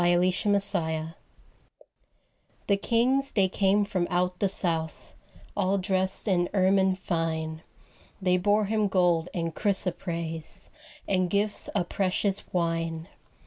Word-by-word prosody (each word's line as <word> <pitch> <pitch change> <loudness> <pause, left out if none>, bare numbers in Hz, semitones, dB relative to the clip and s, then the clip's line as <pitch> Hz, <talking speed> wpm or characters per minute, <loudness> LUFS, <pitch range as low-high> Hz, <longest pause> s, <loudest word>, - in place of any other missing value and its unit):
Christmas 185 +3 +2
Carol 160 -1 -2 1.6
The 200 - +3
kings 255 +6 +1
they 195 -3 +3
came 195 +2 +2
from 185 -3 -1
out 180 0 0
the 200 - +2
south, 165 -4 -2 0.4
All 190 +2 +1
dressed 190 +1 0
in 175 -3 +2
ermine 190 0 +3
fine, 160 -3 -3 0.6
They 180 -2 +2
bore 205 +3 +2
Him 215 0 +1
gold 175 -3 +2
and 165 -2 -3
chrysoprase, 170 -5 -1 0.4
And 185 -2 +1
gifts 205 +2 0
of 180 -4 -2
precious 195 +1 -1
wine. 165 -1 -2
185 Hz, 115 wpm, -27 LUFS, 170-200 Hz, 1.6 s, The